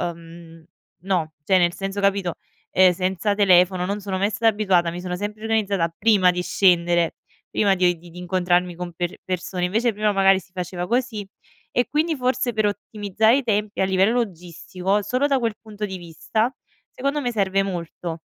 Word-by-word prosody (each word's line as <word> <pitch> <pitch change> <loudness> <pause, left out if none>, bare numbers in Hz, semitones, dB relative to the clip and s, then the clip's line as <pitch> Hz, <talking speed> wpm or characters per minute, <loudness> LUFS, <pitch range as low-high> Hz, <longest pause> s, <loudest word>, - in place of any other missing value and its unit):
uhm, 165 -1 -14 0.4
no, 175 -5 -1
cioè 190 +2 +4
nel 175 -1 +2
senso, 195 +1 -4
capito, 200 -3 +1 0.4
ehm, 185 0 +6
senza 185 +3 -1
telefono 185 -2 +4
non 200 +2 -3
sono 195 -1 -3
mai 200 +2 +1
stata 220 +2 0
abituata, 190 -5 +1
mi 175 - -6
sono 180 0 -4
sempre 210 +3 -5
organizzata 200 -6 0
prima 205 -4 +4
di 180 0 -2
scendere, 175 -3 +2 0.4
prima 200 -2 +3
di 180 -1 +2
di 175 +1 -14
di 170 - -14
incontrarmi 180 0 0
con 175 0 -6
per 175 +1 -4
persone, 180 0 -3
invece 225 +6 +1
prima 210 0 +1
magari 195 -1 +4
si 190 - -19
faceva 180 -1 -4
così 235 -3 -1 0.4
e 245 - +1
quindi 315 +2 0
forse 255 -1 0
per 215 0 +1
ottimizzare 205 +3 +1
i 280 - -1
tempi, 210 -2 -1
a - - +4
livello 190 +2 +3
logistico, 180 +1 -3
solo 255 +7 0
da 275 -2 +2
quel 230 -3 -1
punto 215 -1 -6
di 190 -2 -6
vista, 200 +8 -2 0.4
secondo 280 +3 -2
me 245 -3 -1
serve 195 -3 +1
molto. 170 -3 -5
190 Hz, 180 wpm, -23 LUFS, 180-210 Hz, 0.4 s, ehm